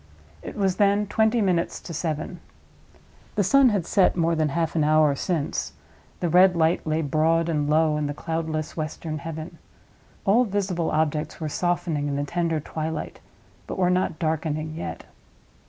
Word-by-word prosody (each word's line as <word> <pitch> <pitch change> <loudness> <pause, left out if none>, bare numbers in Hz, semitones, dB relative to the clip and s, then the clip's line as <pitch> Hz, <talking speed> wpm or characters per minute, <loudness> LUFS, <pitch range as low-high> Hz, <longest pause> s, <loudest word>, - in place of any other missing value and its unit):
It - - -8
was 190 -3 +1
then 205 0 +3
twenty 220 +3 +2
minutes 180 -4 0
to 170 - -8
seven. 160 +2 -3 1.0
The 205 - +2
sun 270 +6 +5
had 200 -6 0
set 190 +1 +3
more 170 -1 +2
than 155 -2 +1
half 165 +3 -1
an 160 - +2
hour 155 -1 +4
since; 155 +1 -2 0.5
the 175 - +1
red 180 +2 +5
light 160 0 +1
lay 155 +1 0
broad 160 +3 +2
and 150 -3 0
low 155 0 +3
in 150 -1 -1
the 145 - -4
cloudless 160 -1 -3
western 155 0 -4
heaven; 160 +2 -7 0.7
all 220 +6 +5
visible 190 -6 -1
objects 155 -1 -1
were 155 -2 -3
softening 170 -3 -1
in 140 - -2
the 140 - -1
tender 165 +1 -1
twilight, 155 +1 -5 0.5
but - - -5
were 180 -1 +3
not 180 -3 0
darkening 155 -1 -2
yet. 85 - -6
160 Hz, 165 wpm, -25 LUFS, 155-180 Hz, 1.0 s, sun